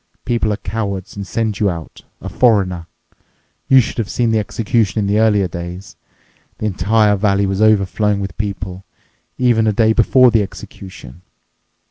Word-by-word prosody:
People 120 -3 0
are 105 - -2
cowards 100 -5 -5
and 100 -1 -6
send 110 -1 -2
you 105 - +2
out—a 85 -3 -9
foreigner. 95 -8 +1 0.8
You 135 - +6
should 120 - -2
have 110 - -2
seen 120 -2 0
the 110 - +2
executions 110 +1 -1
in - - +1
earlier 105 -3 +3
days! 85 +3 -8 0.6
The - - -4
entire 105 +1 +2
valley 100 0 +1
was 95 +1 -2
overflowing 105 -1 +2
with 95 -3 -5
people, 100 -2 -5 0.5
even 120 -3 +2
a - - +3
day 110 +1 +3
before 125 +2 +4
the 115 -2 +3
execution. 95 -6 -10
105 Hz, 150 wpm, -17 LUFS, 95-110 Hz, 0.8 s, You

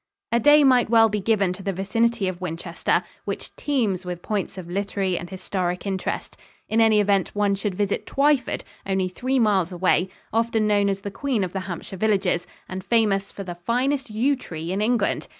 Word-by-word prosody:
A 235 - +3
day 295 +4 +6
might 255 -4 +4
well 225 -1 +6
be 210 0 -1
given 200 -2 +1
to 185 - -9
the 195 0 -1
vicinity 215 +3 0
of 185 -1 -4
Winchester, 170 0 -1 0.2
which - - -5
teems 220 -11 0
with 180 -1 -6
points 205 -3 -2
of 180 -2 -7
literary 195 0 -1
and 175 0 -5
historic 185 -1 -3
interest. 190 -1 -3 0.3
In 225 +1 +2
any 220 -1 +5
event, 200 -2 +1
one 205 -1 +2
should 195 -1 -2
visit 200 +1 -1
Twyford, 280 -3 +1 0.2
only 190 -1 0
three 255 +8 -1
miles 200 -7 +2
away, 180 +1 +2 0.2
often 225 -1 +1
known 205 -1 +3
as 195 0 -2
the 200 - -5
"queen 245 -1 -1
of 180 - -4
the 195 - -1
Hampshire 180 +2 -6
villages" 190 -4 +1 0.2
and 185 0 -6
famous 205 -4 +1
for 200 - -7
the 180 -2 -5
finest 250 +9 -1
yew 240 +7 +1
tree 165 -9 -6
in 195 +2 -1
England. 225 -1 +1
200 Hz, 190 wpm, -24 LUFS, 185-225 Hz, 0.3 s, day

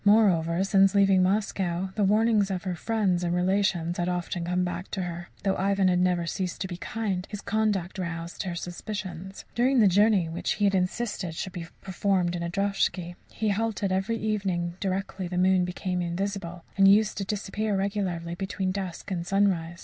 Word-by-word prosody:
Moreover, 190 -5 +4
since 195 0 +4
leaving 195 -2 +5
Moscow 190 -2 0
the 210 - 0
warnings 210 0 +3
of 185 -2 -3
her 185 -2 -2
friends 190 -2 0
and 175 0 0
relations 180 -2 +1
had 175 +1 0
often 175 -1 -2
come 180 +1 0
back 180 +1 -4
to 190 - -3
her. 175 0 -6
Though 195 -1 +2
Ivan 195 0 +2
had 180 -1 +2
never 180 -1 +2
ceased 180 +1 -3
to 190 - -1
be 175 -2 -6
kind, 195 -2 -3
his 205 - -5
conduct 200 -4 -1
roused 170 -1 -4
her 180 -4 -3
suspicions. 185 +1 -6
During 255 +3 +2
the 220 - +6
journey, 200 -1 +4
which 165 +2 -2
he 210 - -3
had 200 - +3
insisted 185 -2 -1
should 185 +3 -4
be 170 -2 -6
performed 185 -2 0
in 170 - -3
a 170 - -2
droshky, 190 -2 0 0.2
he 215 -1 -1
halted 205 -1 0
every 195 +5 0
evening 195 -6 -1
directly 190 -1 -2
the 180 0 -4
moon 185 0 +4
became 180 0 -2
invisible, 175 -1 -3
and 195 0 +6
used 210 +2 +5
to - - -1
disappear 210 +1 -2
regularly 190 -4 -2
between 190 +1 -2
dusk 190 -1 -5
and 175 -2 -1
sunrise. 180 -4 +1
190 Hz, 185 wpm, -27 LUFS, 175-200 Hz, 0.2 s, the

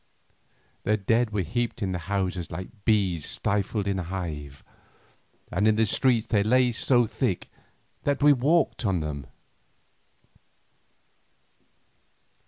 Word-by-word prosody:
The 105 +1 +1
dead 115 +4 +1
were 105 -3 -1
heaped 115 +5 -2
in 95 - -1
the 90 - -2
houses 90 -1 -2
like 100 +3 -9
bees 95 -8 +2
stifled 100 0 -1
in 100 -1 0
a - - -3
hive, 80 -6 -6 0.9
and 100 +4 +2
in 110 - +4
the 110 +1 +3
streets 115 +1 +2
they 105 -2 +2
lay 125 +4 +3
so 120 +1 +3
thick - - -2 0.5
that 145 0 0
we 145 0 +7
walked 145 +4 +2
upon 95 -7 0
them. 70 -3 -5
105 Hz, 125 wpm, -26 LUFS, 90-120 Hz, 0.9 s, we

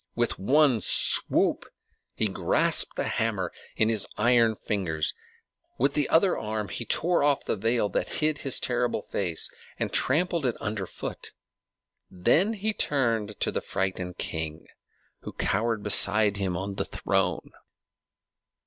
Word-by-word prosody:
With 120 0 -1
one 130 +2 +3
swoop - - +3 0.5
he 110 - +1
grasped 95 - +1
the - - -2
hammer 105 -6 -2 0.2
in 110 - +2
his 110 -3 0
iron 115 -1 +3
fingers; 85 -8 -2 0.6
with 140 +3 +1
the 145 - 0
other 180 +3 +3
arm 105 -1 -4
he 115 - -5
tore 175 +8 +2
off 145 -1 +1
the - - -1
veil 115 +1 0
that 90 - -2
hid 155 -1 0
his 135 -3 +1
terrible 120 -3 -1
face, 85 -5 -2 0.3
and - - -3
trampled 165 +1 +2
it 120 - -2
under 105 -3 -4
foot; - - -7 0.8
then 165 - +2
he 215 +1 -2
turned 115 - 0
to - - +2
the - - -3
frightened 95 -2 -3
king, 80 -1 -4 0.5
who - - -9
cowered 115 -2 -1
beside 105 0 +4
him 95 -3 -2
on 95 +1 -5
the - - -1
throne. - - -1
110 Hz, 140 wpm, -26 LUFS, 100-135 Hz, 0.8 s, beside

